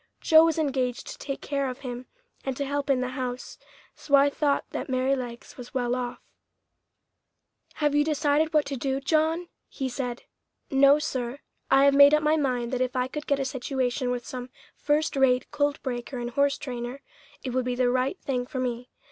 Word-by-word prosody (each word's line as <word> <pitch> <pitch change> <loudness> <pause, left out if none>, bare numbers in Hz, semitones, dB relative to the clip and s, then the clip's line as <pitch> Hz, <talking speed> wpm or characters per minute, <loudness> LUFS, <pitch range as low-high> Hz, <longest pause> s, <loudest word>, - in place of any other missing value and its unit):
Joe 320 0 +6
was 330 -1 +1
engaged 260 -5 -1
to - - -7
take 275 -1 -5
care 280 -2 -1
of 255 - -8
him 250 -1 -6 0.4
and 265 -2 -3
to 280 - -1
help 285 +1 -2
in 265 -2 +3
the 255 - -1
house, 255 -1 -5 0.4
so 285 - +2
I 280 +1 +5
thought 285 -1 0
that - - -4
Merrylegs 255 -2 -2
was 250 +1 -10
well 245 -1 0
off. 245 -1 -3 1.6
"Have 295 -1 +1
you 295 0 +4
decided 305 0 +1
what 305 -2 +3
to 280 - -4
do, 265 +1 -1
John?" 320 +4 +1 0.2
he 270 - -3
said. 245 -1 -4 0.5
"No, 275 +1 +6
sir; 255 -3 -3 0.3
I 270 - +5
have 280 - +5
made 285 +1 +8
up 300 - 0
my 305 +1 +3
mind 250 -5 -1
that 255 - 0
if 255 +1 -1
I 250 0 +1
could 295 +3 -6
get 280 -1 +1
a 270 - -1
situation 255 -1 -2
with 245 -1 -2
some 250 0 -6 0.3
first 300 +1 0
rate 260 -1 +2
colt 290 0 0
breaker 250 0 -4
and 240 0 -4
horse 280 +2 +2
trainer, 250 +1 -6 0.4
it 255 - -3
would 255 0 0
be 250 -1 -1
the 245 -1 +2
right 255 +8 0
thing 250 -2 -2
for 260 - -5
me. 245 -1 -3
265 Hz, 200 wpm, -26 LUFS, 250-285 Hz, 1.6 s, made